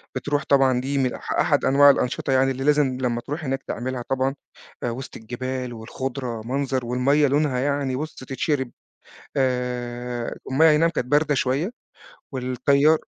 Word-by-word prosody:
بتروح 145 +2 -1
طبعًا، 130 -3 +4
دي 140 +2 -2
من 130 -2 +1
أح - - -7
أحد - - +2
أنواع 140 +1 +7
الأنشطة 135 -1 +1
يعني، 135 0 +3
اللي 135 0 -4
لازم 145 -3 +3
لمَّا 120 -2 0
تروح 150 +5 -5
هناك 135 -1 -2
تعملها 125 0 -3
طبعًا. 135 +1 0 0.5
آآ، 120 - 0
وسط 125 +3 -6
الجبال 125 +2 -4
والخضرة، 120 +1 -5
منظر 130 0 -1
والمَيّة 135 +5 +3
لونها 140 -2 +1
يعني 140 -1 0
بُص، 155 +4 -4
تتشرَّب. 130 0 -2 0.7
آآ، 125 -2 -2 0.2
المَيّة 160 +5 +6
إي 150 - +5
نعم 165 +2 +3
كانت 150 -7 -3
باردة 145 +2 +2
شوية، 135 - 0 0.6
والتيار 140 +4 +3
130 Hz, 155 wpm, -23 LUFS, 125-140 Hz, 0.7 s, أنواع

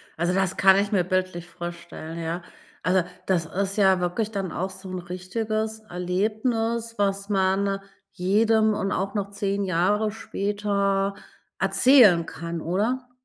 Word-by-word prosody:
Also, 170 +2 0
das 185 0 0
kann 190 0 +6
ich 200 +1 +1
mir 190 -4 +3
bildlich 185 -1 -2
vorstellen, 170 -1 -7
ja. 165 +1 -3 0.4
Also, 185 0 +3 0.2
das 170 -4 +1
ist 195 +3 -2
ja 190 -2 +4
wirklich 180 +5 -1
dann 195 -4 -3
auch 185 +2 -2
so 190 0 -10
'n 185 - -3
richtiges 215 +5 -3
Erlebnis 220 +6 -1
was 200 0 0
man 195 0 +1 0.3
jedem 215 +3 +2
und 200 -1 -2
auch 195 +2 -2
noch 200 -1 -2
10 200 0 -1
Jahre 195 +4 +1
später 200 -2 -1 0.4
erzählen 225 -11 +5
kann 170 0 -5
oder? 230 +10 -1
195 Hz, 140 wpm, -25 LUFS, 180-210 Hz, 0.4 s, kann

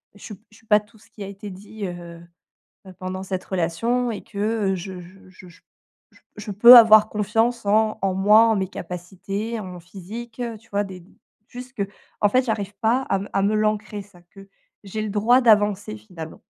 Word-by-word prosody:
je 205 - -16
su 215 - -8 0.2
je 215 - -19
suis 225 - -25
pas 210 -1 +4
tout 210 +2 -23
ce - - -22
qui 210 - -10
a - - -7
été 200 +1 -9
dit, 205 +2 -8
heu 175 -2 -8 0.7
heu, 190 - -12
pendant 185 0 -5
cette 185 -1 -4
relation 230 +8 -1
et 215 - -6
que, 200 - -11 0.3
heu, - - 0
je 185 0 -7
je 185 +2 -16
je 185 0 -16
je 175 - -19 0.5
j - - -24 0.2
je 210 +1 -7
peux 235 +5 +9
avoir 215 -2 +8
confiance 225 +3 0
en 215 +1 +2
en 195 -1 +1
moi, 210 +4 +5
en 220 - +2
mes 190 -1 -1
capacités, 195 +5 -6
en 200 - -7
mon 180 -1 -9
physique, 210 +7 -10
heu, 235 -2 -4
tu 225 +2 -25
vois, 205 0 0
des 185 -3 -10 0.4
juste 250 +2 -11
que, 200 - -1 0.4
en 205 - +4
fait, 255 +5 +2
j'arrive 205 -4 -3
pas 235 +4 +2
à 195 -7 -1
me 200 - -7
à 195 - +2
me 205 +2 +1
l'ancrer, 215 -1 -1
ça, 195 -3 -20
que 195 0 -14 0.3
j'ai 215 +2 -5
le 215 - -4
droit 225 +5 +3
d'avancer 205 - +2
finalement. 160 +9 -10
205 Hz, 215 wpm, -22 LUFS, 190-220 Hz, 0.7 s, peux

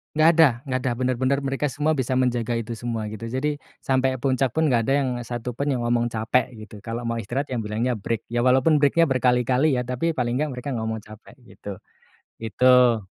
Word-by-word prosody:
Gak 160 +2 +4
ada 160 -2 +8 0.2
gak 130 0 0
ada. 125 - +1
Bener-bener 130 +2 0
mereka 135 +1 -2
semua 150 +2 0
bisa 130 0 -1
menjaga 120 -2 0
itu 115 0 -4
semua 115 -2 -4
gitu. 110 +2 -7
Jadi 140 +5 -2 0.2
sampai 130 0 +1
puncak 130 -2 +1
pun 160 -2 +2
gak 115 -3 +2
ada 135 - +1
yang 130 - -1 0.2
satu 120 0 -5
pun 140 - -1
yang 130 -4 0
ngomong 120 0 +1
capek 120 +2 0
gitu. 110 -1 -11
Kalau 115 +1 -4
mau 115 0 -2
istirahat 120 +7 -3
ya 125 - -2
bilangnya 110 +2 -1
break. 115 +2 -3
Ya 120 +1 0
walaupun 130 +4 +4
break-nya 150 +2 +3
berkali-kali 130 +3 +2
ya, 125 - +1
tapi 130 +7 -2
paling 125 -1 -1
gak 150 +1 -1
mereka 125 +3 -7
gak 125 - -2
ngomong 110 -1 -3
capek, 110 +3 -15
gitu. 100 -4 -9 0.6
Itu. 125 +1 +4
125 Hz, 205 wpm, -24 LUFS, 115-135 Hz, 0.6 s, ada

